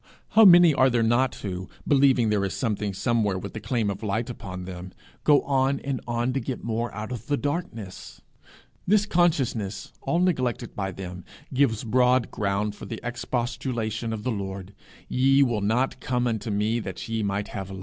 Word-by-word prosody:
How 225 Hz, 0 st, +7 dB
many 175 Hz, -3 st, +8 dB
are 130 Hz, -1 st, +4 dB
there 120 Hz, -2 st, +2 dB
not 120 Hz, +3 st, +2 dB
who, 95 Hz, -2 st, -5 dB, 0.2 s
believing 135 Hz, -5 st, +4 dB
there 105 Hz, -2 st, +1 dB
is 95 Hz, -, -2 dB
something 105 Hz, -4 st, -1 dB
somewhere 105 Hz, 0 st, 0 dB
with 95 Hz, +1 st, -7 dB
the 110 Hz, -, -5 dB
claim 110 Hz, -1 st, -1 dB
of 100 Hz, +2 st, -7 dB
light 110 Hz, +3 st, -2 dB
upon 95 Hz, -6 st, -7 dB
them, 90 Hz, 0 st, -8 dB, 0.3 s
go 145 Hz, -2 st, +5 dB
on 135 Hz, 0 st, +1 dB
and 140 Hz, -2 st, -3 dB
on 120 Hz, +1 st, 0 dB
to 135 Hz, -, 0 dB
get 125 Hz, 0 st, -5 dB
more 115 Hz, +1 st, -2 dB
out 105 Hz, +3 st, -6 dB
of 120 Hz, -2 st, -6 dB
the 145 Hz, -, +1 dB
darkness! 145 Hz, -, -5 dB, 0.7 s
This 205 Hz, +2 st, +4 dB
consciousness, 140 Hz, -, 0 dB
all 170 Hz, -, 0 dB
neglected 130 Hz, -10 st, 0 dB
by 95 Hz, -1 st, -2 dB
them, 90 Hz, -1 st, -8 dB, 0.3 s
gives 125 Hz, -5 st, +2 dB
broad 125 Hz, +1 st, +3 dB
ground 100 Hz, 0 st, -1 dB
for -, -, -10 dB
the 115 Hz, -, -5 dB
expostulation 120 Hz, -2 st, -3 dB
of 110 Hz, -1 st, -4 dB
the 125 Hz, -, -1 dB
Lord 95 Hz, -2 st, -5 dB, 0.3 s
'Ye 135 Hz, +2 st, +4 dB
will 120 Hz, -5 st, 0 dB
not 120 Hz, +6 st, 0 dB
come 125 Hz, -1 st, -1 dB
unto 115 Hz, -1 st, -2 dB
me 105 Hz, +3 st, 0 dB
that -, -, -6 dB
ye 115 Hz, -1 st, -1 dB
might 100 Hz, 0 st, -2 dB
have 95 Hz, -2 st, -6 dB
life!' 95 Hz, -1 st, -7 dB
115 Hz, 185 wpm, -25 LUFS, 105-130 Hz, 0.7 s, many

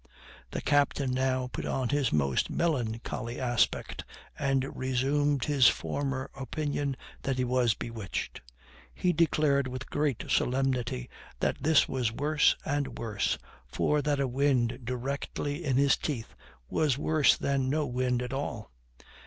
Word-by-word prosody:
The -, -, -4 dB
captain 145 Hz, -2 st, +2 dB
now 130 Hz, 0 st, +1 dB
put -, -, -3 dB
on 130 Hz, -3 st, -1 dB
his 140 Hz, -3 st, +1 dB
most 70 Hz, -3 st, +1 dB
melancholy 120 Hz, -6 st, -2 dB
aspect, 120 Hz, -2 st, 0 dB, 0.4 s
and 135 Hz, -1 st, 0 dB
resumed 135 Hz, +2 st, +1 dB
his 140 Hz, -5 st, +5 dB
former 130 Hz, -, -1 dB
opinion 145 Hz, 0 st, -2 dB, 0.2 s
that 135 Hz, -1 st, -1 dB
he 130 Hz, -, +1 dB
was 125 Hz, -2 st, +2 dB
bewitched. 115 Hz, -4 st, -5 dB, 0.5 s
He 180 Hz, -, +1 dB
declared 150 Hz, -4 st, +2 dB
with 130 Hz, 0 st, -7 dB
great 145 Hz, -5 st, 0 dB
solemnity 125 Hz, -, 0 dB, 0.3 s
that -, -, 0 dB
this 155 Hz, -1 st, +4 dB
was 125 Hz, -4 st, 0 dB
worse 150 Hz, +5 st, +3 dB
and 145 Hz, -1 st, -1 dB
worse, 105 Hz, -5 st, -1 dB, 0.3 s
for 150 Hz, -, +1 dB
that 145 Hz, -1 st, 0 dB
a 135 Hz, -, +1 dB
wind 125 Hz, -2 st, +1 dB
directly 140 Hz, +5 st, -3 dB
in 135 Hz, -5 st, +1 dB
his 140 Hz, 0 st, +5 dB
teeth 120 Hz, -7 st, -4 dB, 0.3 s
was 145 Hz, -, +1 dB
worse 155 Hz, 0 st, +4 dB
than 135 Hz, -2 st, 0 dB
no 150 Hz, +2 st, +1 dB
wind 125 Hz, -1 st, 0 dB
at 125 Hz, +1 st, -5 dB
all. 120 Hz, -, -4 dB
135 Hz, 135 wpm, -29 LUFS, 125-145 Hz, 0.5 s, his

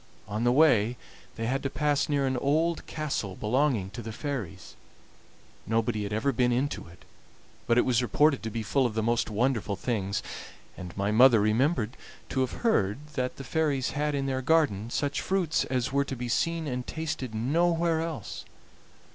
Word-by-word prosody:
On 105 Hz, +3 st, -2 dB
the 120 Hz, -, +4 dB
way 125 Hz, -5 st, +4 dB, 0.4 s
they 115 Hz, -, -3 dB
had 135 Hz, +4 st, 0 dB
to 135 Hz, -, -2 dB
pass 145 Hz, +3 st, 0 dB
near 140 Hz, -2 st, +1 dB
an 130 Hz, 0 st, 0 dB
old 155 Hz, +6 st, 0 dB
castle 140 Hz, -, -3 dB
belonging 115 Hz, -3 st, 0 dB
to 120 Hz, -, -7 dB
the 115 Hz, -, -6 dB
fairies. 125 Hz, -, -5 dB, 0.9 s
Nobody 110 Hz, -1 st, 0 dB
had 100 Hz, 0 st, -4 dB
ever 110 Hz, +6 st, +1 dB
been 125 Hz, 0 st, +2 dB
into 130 Hz, -, -1 dB
it, 85 Hz, +2 st, -17 dB, 0.6 s
but 115 Hz, 0 st, +3 dB
it -, -, +4 dB
was 125 Hz, -1 st, +2 dB
reported 140 Hz, +5 st, +3 dB
to 110 Hz, -, -4 dB
be 110 Hz, +1 st, -4 dB
full 130 Hz, +4 st, +2 dB
of 110 Hz, -, -7 dB
the 110 Hz, -, 0 dB
most 115 Hz, +1 st, +1 dB
wonderful 110 Hz, -2 st, 0 dB
things, 100 Hz, -1 st, -2 dB, 0.5 s
and 90 Hz, -1 st, -9 dB
my 100 Hz, +1 st, 0 dB
mother 120 Hz, +1 st, +7 dB
remembered 115 Hz, +3 st, +1 dB, 0.3 s
to 130 Hz, -, -2 dB
have 130 Hz, -, -2 dB
heard 105 Hz, -, +2 dB, 0.2 s
that 125 Hz, -3 st, -2 dB
the 135 Hz, -, -8 dB
fairies 145 Hz, -3 st, 0 dB
had 150 Hz, 0 st, -1 dB
in 135 Hz, -1 st, -1 dB
their 130 Hz, -1 st, -1 dB
garden 130 Hz, -8 st, +2 dB
such 140 Hz, +3 st, -1 dB
fruits 185 Hz, -5 st, 0 dB
as 130 Hz, 0 st, -1 dB
were 140 Hz, 0 st, +2 dB
to 135 Hz, -, -4 dB
be 125 Hz, 0 st, -4 dB
seen 165 Hz, +6 st, 0 dB
and 125 Hz, -3 st, -4 dB
tasted 150 Hz, -7 st, -4 dB
nowhere 165 Hz, +6 st, +1 dB
else. 160 Hz, -, -5 dB
125 Hz, 180 wpm, -28 LUFS, 110-145 Hz, 0.9 s, mother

